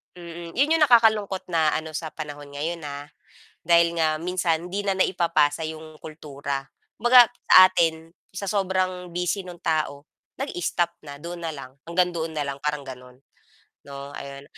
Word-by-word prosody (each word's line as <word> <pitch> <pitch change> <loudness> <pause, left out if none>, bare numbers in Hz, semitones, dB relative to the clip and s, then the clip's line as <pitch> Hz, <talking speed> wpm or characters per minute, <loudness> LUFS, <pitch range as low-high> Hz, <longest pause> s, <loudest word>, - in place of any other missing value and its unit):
Mm, 170 -1 -9
'yon 280 +4 +2
'yong 315 - +4
nakakalungkot 220 -6 +4
na 160 -3 +2
ano 160 0 -3
sa 160 0 -5
panahon 145 -2 -8
ngayon, 165 +4 -3
ah. 145 0 -7 0.6
Dahil 170 0 +4
nga 155 -1 +1
minsan 175 -1 -1
'di 200 +2 -3
na 195 - +2
naipapasa 165 -5 +1
'yong 155 0 -8
kultura. 140 -3 -6 0.3
Kumbaga, 240 +1 +7 0.2
sa 185 - +10
atin, 165 -3 0 0.2
sa 190 +1 -6
sobrang 185 -2 -1
busy 180 +3 -2
no'ng 180 -2 -10
tao, 155 -3 -1 0.3
nag-stop 175 - -1
na, 145 -2 -10
doon 170 +3 -8
na 165 - -2
lang, 135 -3 -10 0.2
hanggang 180 +1 +1
doon 165 -1 -3
na 145 - -1
lang, 140 0 -6
parang 150 -1 -2
gano'n, 125 -1 -11 0.7
'no 140 0 -8
ayun. 140 -1 -8
165 Hz, 160 wpm, -24 LUFS, 150-180 Hz, 0.7 s, sa